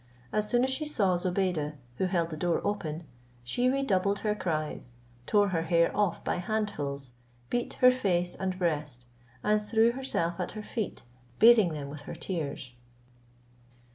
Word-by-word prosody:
As 210 0 0
soon 245 0 +3
as 260 - +1
she 265 +4 0
saw 205 -12 +1
Zobeide, 175 -4 -1 0.2
who - - +1
held 170 -3 0
the - - -3
door 170 +2 +1
open, 170 -6 -2 0.4
she 245 - +1
redoubled 205 -8 +1
her 210 - +3
cries, 155 -10 -3 0.3
tore 205 -1 +4
her 170 -3 0
hair 170 0 +2
off 205 -5 +1
by - - -1
handfuls, 150 - -3 0.4
beat 240 0 -1
her 255 0 +7
face 180 -8 0
and 185 -1 -3
breast, 150 -8 -2 0.4
and 210 0 +3
threw 225 +2 +3
herself 215 -10 -2
at 180 - -3
her 215 0 -6
feet, 220 -1 -4 0.3
bathing 220 -7 +7
them 145 -2 -5
with 145 0 -8
her - - -5
tears. 150 -7 -4
185 Hz, 160 wpm, -29 LUFS, 165-215 Hz, 0.4 s, her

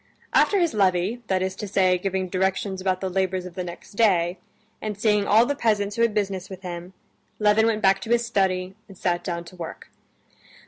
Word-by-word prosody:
After 405 - +4
his 340 -4 +1
levee, 195 +3 +1
that 185 -1 +1
is 190 0 -2
to 210 - -5
say, 185 -2 +2
giving 190 0 -2
directions 190 +1 -1
about 185 -1 0
the 190 - -1
labors 185 0 -1
of 180 - -8
the 180 - -4
next 175 -1 -9
day, 185 -5 +2 0.4
and 210 -2 -4
seeing 210 -2 +2
all 225 +3 +6
the 285 - 0
peasants 210 -6 0
who 230 - -1
had 230 -2 +2
business 195 -3 -2
with 190 0 -9
him, 175 0 -7 0.4
Levin 210 +1 +4
went 215 -1 0
back 195 0 +4
to 225 - -7
his 235 0 +2
study 190 -4 0
and 195 -3 -14
sat 175 -1 -1
down 170 -1 -3
to 175 +2 -13
work. 165 -2 -8
190 Hz, 210 wpm, -24 LUFS, 185-210 Hz, 0.4 s, all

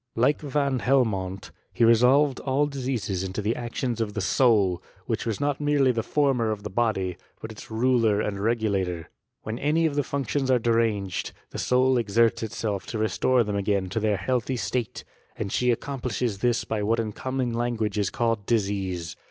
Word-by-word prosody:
Like 130 +6 +2
Vaa 140 -3 0
Helmont, 100 -8 0 0.2
he 115 - +3
resolved 125 +5 +4
all 135 +2 +1
diseases 125 -10 -3
into 95 +2 -4
the 105 +3 0
actions 120 0 -3
(rf 110 -2 -2
the 110 +5 0
«ou/, 100 -8 +3 0.2
which - - -2
was 110 -3 -2
not 145 0 -1
merely 145 -3 +3
the 115 -2 -1
former 130 -2 +1
of 105 -2 -3
the 105 - -6
body, 95 -5 0 0.2
but 110 - -7
its 110 - -11
ruler 115 -2 +2
and 105 -2 -2
regulator. 100 -6 -1 0.3
When 110 +3 -4
any 155 +3 +2
of 155 - +1
the 145 - +1
fuDo 140 -3 -3
lions 135 -2 0
are 130 - +5
deranged, 115 -5 0 0.2
the - - -5
soul 130 +1 +3
exerU 115 0 +2
itself 110 -3 -3
to 115 - -4
restore 110 +4 +2
them 105 -1 -3
again 100 -2 0
to 105 - -1
their 105 -2 +1
healthy 125 +5 -1
state; 120 -2 -3 0.3
and 100 -3 -4
she 125 0 +2
accom 130 +3 -3
plishes 120 -4 -2
this 120 +2 +1
by 110 -2 -2
what 115 +3 +1
in 110 -2 -2
common 130 +1 -2
langui^e 115 -3 -1
is 100 - +1
called 115 -4 -1
disease. 95 -6 -1
115 Hz, 185 wpm, -25 LUFS, 105-130 Hz, 0.3 s, are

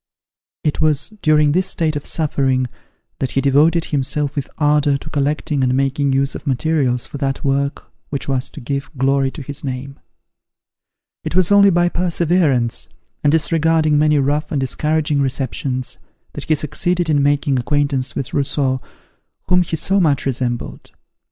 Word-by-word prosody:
It 150 - -1
was 150 -2 +3
during 150 -2 +4
this 185 +4 +2
state 160 -3 0
of 145 - -4
suffering, 135 -5 0 0.5
that 130 - -2
he - - +2
devoted 150 +5 +3
himself 145 +1 -1
with 140 -3 -3
ardour 150 -2 +2
to 155 - -10
collecting 145 0 -1
and 130 0 +2
making 135 +1 +1
use 135 +1 +1
of - - -9
materials 130 -3 +1
for 140 +4 -8
that 135 -1 -2
work 140 0 -1 0.2
which 140 - -4
was 130 -2 -1
to - - -11
give 140 +3 -4
glory 135 +1 +2
to 145 +2 -9
his 140 +2 -5
name. 135 +1 -5 1.2
It - - -4
was 185 0 +3
only 200 0 +7
by 175 -1 +3
perseverance, 170 -8 +1 0.4
and 145 - +4
disregarding 160 -1 +2
many 150 0 +3
rough 145 +2 0
and 145 - 0
discouraging 150 +2 0
receptions, 130 -1 -2 0.3
that - - -7
he 155 - +2
succeeded 175 +4 0
in 150 -2 +2
making 140 -1 +1
acquaintance 135 -2 0
with 135 - -4
Rousseau, 135 -2 0 0.7
whom 180 0 +5
he 170 -2 -2
so 190 +5 +1
much 145 -6 +2
resembled. 125 -2 -3
145 Hz, 160 wpm, -19 LUFS, 135-155 Hz, 1.2 s, only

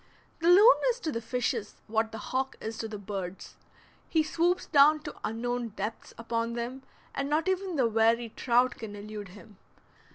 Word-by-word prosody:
The 330 - 0
loon 410 +7 +8
is - - -1
to 315 - -2
the 230 - -3
fishes 235 -3 -2
what 220 0 0
the 225 - -6 0.2
hawk 265 +1 0
is 220 0 -6
to 225 - -3
the 215 -1 -6
birds; 195 -2 -6 0.5
he 320 -2 +3
swoops 345 +3 +1
down 300 +2 +5
to - - -7
unknown 240 +2 -2
depths 210 +3 -5
upon 230 0 -2
them, 240 +3 -4 0.3
and 275 0 -2
not 310 +4 +1
even 375 -1 -1
the 265 -4 +3
wary 225 +1 +2
trout 245 +2 +1
can 215 -2 -7
elude 205 0 -7
him. 205 +2 -15
235 Hz, 175 wpm, -29 LUFS, 220-300 Hz, 0.5 s, loon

